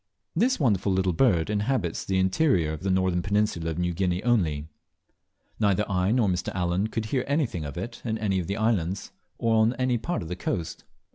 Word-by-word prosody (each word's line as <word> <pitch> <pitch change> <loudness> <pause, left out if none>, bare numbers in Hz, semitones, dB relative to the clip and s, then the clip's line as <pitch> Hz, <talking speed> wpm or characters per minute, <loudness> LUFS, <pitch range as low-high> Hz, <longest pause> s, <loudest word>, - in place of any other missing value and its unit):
This 245 +9 +2
wonderful 105 - +2
little 95 -1 +1
bird 85 -5 +3
inhabits 105 -4 -1
the 95 - -1
interior 95 - +2
of 80 - -7
the 95 - -1
northern 95 -1 +2
peninsula 100 -4 0
of 80 - -4
New 90 0 0
Guinea 90 +1 -1
only. 80 -12 +1 0.9
Neither 105 -1 +2
I 95 0 +1
nor 120 -3 +3
Mr. 90 -1 -1
Allen 90 +3 0
could 110 0 -3
hear 125 +4 0
anything 135 - 0
of 70 +1 -7
it 105 +7 -6
in 110 -2 -1
any 100 -3 0
of 85 - -4
the 100 - -2
islands 100 -5 0 0.3
or 115 -1 +2
on 110 +2 +3
any 125 -2 0
part 175 - -2
of - - -7
the 90 - -4
coast. 85 -2 -4
95 Hz, 200 wpm, -26 LUFS, 90-115 Hz, 0.9 s, bird